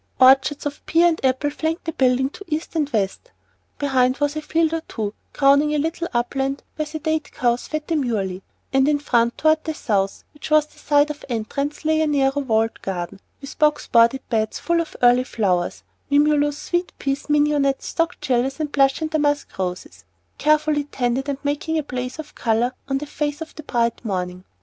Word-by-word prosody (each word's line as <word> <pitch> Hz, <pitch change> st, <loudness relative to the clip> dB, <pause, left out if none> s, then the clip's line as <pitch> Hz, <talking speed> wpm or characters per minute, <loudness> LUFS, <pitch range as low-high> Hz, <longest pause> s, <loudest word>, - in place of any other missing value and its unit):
Orchards 270 Hz, +3 st, +5 dB
of 290 Hz, 0 st, -4 dB
pear 335 Hz, +2 st, +4 dB
and 320 Hz, -, -3 dB
apple 265 Hz, +3 st, +1 dB
flanked 320 Hz, +4 st, -3 dB
the 325 Hz, -, -1 dB
building 265 Hz, -1 st, +2 dB
to 400 Hz, -, -10 dB
east 315 Hz, +1 st, -3 dB
and 300 Hz, -3 st, +1 dB
west. 215 Hz, -, -2 dB, 0.5 s
Behind 260 Hz, -2 st, +2 dB
was 290 Hz, 0 st, 0 dB
a 310 Hz, -, -2 dB
field 320 Hz, +1 st, +1 dB
or 330 Hz, -, -1 dB
two 210 Hz, -2 st, -4 dB, 0.2 s
crowning 285 Hz, +2 st, +4 dB
a -, -, +2 dB
little 325 Hz, +3 st, -1 dB
upland 270 Hz, +3 st, -1 dB
where 305 Hz, -1 st, -2 dB
sedate 315 Hz, 0 st, -2 dB
cows 240 Hz, 0 st, 0 dB
fed 310 Hz, -1 st, -3 dB
demurely; 220 Hz, -, -1 dB, 0.3 s
and 270 Hz, +1 st, +4 dB
in 295 Hz, -1 st, +3 dB
front, 240 Hz, -5 st, +1 dB
toward 315 Hz, 0 st, +3 dB
the 315 Hz, -1 st, -3 dB
south, 195 Hz, -7 st, -1 dB
which 295 Hz, -, -9 dB
was 305 Hz, -1 st, +5 dB
the -, -, -22 dB
side 290 Hz, 0 st, +3 dB
of 295 Hz, -, -10 dB
entrance, 280 Hz, +7 st, -3 dB
lay 315 Hz, 0 st, +3 dB
a 315 Hz, -, +2 dB
narrow 280 Hz, -1 st, +2 dB
walled 225 Hz, -3 st, 0 dB
garden, 180 Hz, 0 st, -4 dB, 0.2 s
with 275 Hz, -, -10 dB
box 300 Hz, -1 st, +3 dB
bordered 235 Hz, +3 st, +3 dB
beds 220 Hz, -2 st, 0 dB
full 340 Hz, 0 st, +1 dB
of 330 Hz, -, -7 dB
early 245 Hz, +1 st, +6 dB
flowers, 185 Hz, -8 st, -1 dB, 0.3 s
mimulus, 290 Hz, 0 st, +3 dB
sweet 350 Hz, +3 st, -2 dB
peas, 275 Hz, +2 st, -3 dB
mignonette, 290 Hz, -2 st, +2 dB
stock 330 Hz, +1 st, -1 dB
gillies, 265 Hz, +3 st, 0 dB
and 300 Hz, -2 st, -2 dB
blush 275 Hz, +1 st, +3 dB
and 315 Hz, -1 st, -2 dB
damask 290 Hz, -2 st, 0 dB
roses, 180 Hz, -, -4 dB, 0.4 s
carefully 305 Hz, -1 st, +2 dB
tended 260 Hz, 0 st, -1 dB
and 280 Hz, -, -1 dB
making 295 Hz, +3 st, -1 dB
a 310 Hz, -, 0 dB
blaze 250 Hz, -1 st, -5 dB
of 315 Hz, -1 st, -8 dB
color 235 Hz, +2 st, 0 dB, 0.2 s
on 270 Hz, -, +1 dB
the 290 Hz, -, -4 dB
face 295 Hz, 0 st, -3 dB
of 320 Hz, -, -7 dB
the 310 Hz, -, -9 dB
bright 235 Hz, -5 st, -1 dB
morning. 180 Hz, -4 st, -3 dB
285 Hz, 190 wpm, -22 LUFS, 245-305 Hz, 0.5 s, early